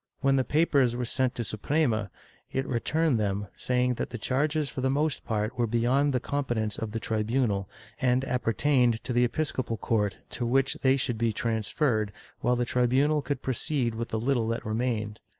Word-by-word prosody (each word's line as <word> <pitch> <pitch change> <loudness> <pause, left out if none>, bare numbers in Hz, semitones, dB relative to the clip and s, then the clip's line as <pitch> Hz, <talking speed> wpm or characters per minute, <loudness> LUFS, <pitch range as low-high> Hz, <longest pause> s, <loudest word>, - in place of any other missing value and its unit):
When 135 -1 +3
the 130 - +3
papers 140 -3 +2
were 125 0 -2
sent 130 +1 0
to - - -2
the 115 - -3
Suprema, 110 -3 0 0.4
it 135 0 -1
returned 135 +2 +1
them, 100 -1 -1
saying 125 0 +1
that - - -2
the 120 - -5
charges 145 +6 0
for 130 - -5
the 130 - +1
most 145 +1 0
part 110 +1 -2
were 120 - +2
beyond 125 +6 +2
the 125 - +1
competence 120 -6 -2
of 110 -1 -4
the 115 - -2
tribunal, 110 -2 0 0.3
and 130 0 +2
appertained 125 -1 +2
to 125 - -3
the 120 +1 +4
episcopal 130 -3 -2
court, 105 -3 0
to 120 - -3
which 130 +3 +2
they 130 0 +4
should 120 -4 -1
be 115 -1 +2
transferred, 110 0 0 0.3
while 125 - +2
the 120 0 0
tribunal 130 +5 +2
could 140 -2 -3
proceed 130 -2 -1
with 115 +1 -4
the 110 - -1
little 120 -1 +1
that 115 0 -2
remained. 110 -1 -2
125 Hz, 185 wpm, -28 LUFS, 110-135 Hz, 0.4 s, the